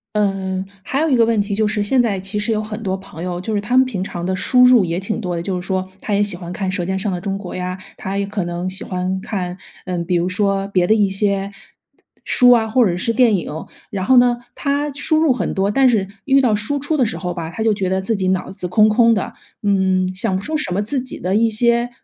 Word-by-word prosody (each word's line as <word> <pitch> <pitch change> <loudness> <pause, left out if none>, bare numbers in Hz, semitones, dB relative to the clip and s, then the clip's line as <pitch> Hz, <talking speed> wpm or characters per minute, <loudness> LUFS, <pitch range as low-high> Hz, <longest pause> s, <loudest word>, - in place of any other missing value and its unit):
嗯， 195 -2 -1 0.2
还 270 - -2
有 320 +1 +1
一 270 - +3
个 230 -2 +4
问 225 -1 +1
题 200 0 -3
就 215 +1 +1
是 210 0 0
现 250 +5 +3
在 210 -5 0
其 195 +3 -1
实 210 +2 0
有 215 -1 0
很 215 +1 -6
多 190 -2 -1
朋 190 -3 -10
友 180 -1 -3
就 215 +4 -3
是 205 - 0
他 240 +5 0
们 260 - +6
平 205 -8 -3
常 175 -2 -5
的 185 +1 -1
输 250 +6 +4
入 250 -4 +6
也 170 0 -2
挺 215 +4 -4
多 180 -4 -3
的， - - -2
就 180 0 -3
是 - - -11
说 185 -1 -2
他 210 - -3
也 200 - +2
喜 205 -3 +2
欢 175 -1 -8
看 190 +1 -3
《舌 180 -2 -2
尖 190 +1 -2
上 205 - -1
的 180 -2 -3
中 195 0 -3
国》 190 -3 -8
呀， 180 0 -4 0.2
他 195 +1 -4
也 200 - 0
可 200 -1 -3
能 175 +1 -3
喜 185 +1 -5
欢 185 +1 -3
看， 185 -3 -4 0.3
嗯， 180 -2 -2
比 180 +1 -1
如 170 +1 0
说 195 +1 0
别 185 -3 +1
的 215 - +4
一 210 -3 +3
些 195 0 +1 0.8
书 250 -1 +5
啊， 230 -2 +4
或 240 +2 +3
者 175 -3 0
是 230 +5 -1
电 235 -1 +4
影。 160 -2 -6 0.2
然 195 -2 -3
后 260 +6 +4
呢， 245 -1 +5 0.2
他 290 +1 -1
输 310 +3 0
入 315 -2 +3
很 255 - -1
多， 195 +1 0
但 265 +4 +4
是 215 -5 +1 0.2
遇 275 0 +4
到 245 -5 +2
输 210 +7 -1
出 285 +3 -1
的 255 - +3
时 190 -6 -4
候 180 0 -4
吧， 165 -2 -5
他 220 +6 -4
就 220 -1 +3
觉 195 -2 -2
得 190 +1 0
自 195 +4 -1
己 190 -1 -1
脑 185 -1 -1
子 190 -2 -5
空 215 +4 +4
空 230 +1 +4
的， 220 - -2 0.3
嗯， 190 -2 +1
想 185 0 0
不 190 - -2
出 310 +8 -2
什 185 -12 -2
么 200 - 0
自 255 +6 -1
己 255 0 -6
的 185 +2 -1
一 225 0 +3
些 235 +2 +2
200 Hz, 295 characters per minute, -19 LUFS, 185-230 Hz, 0.8 s, 们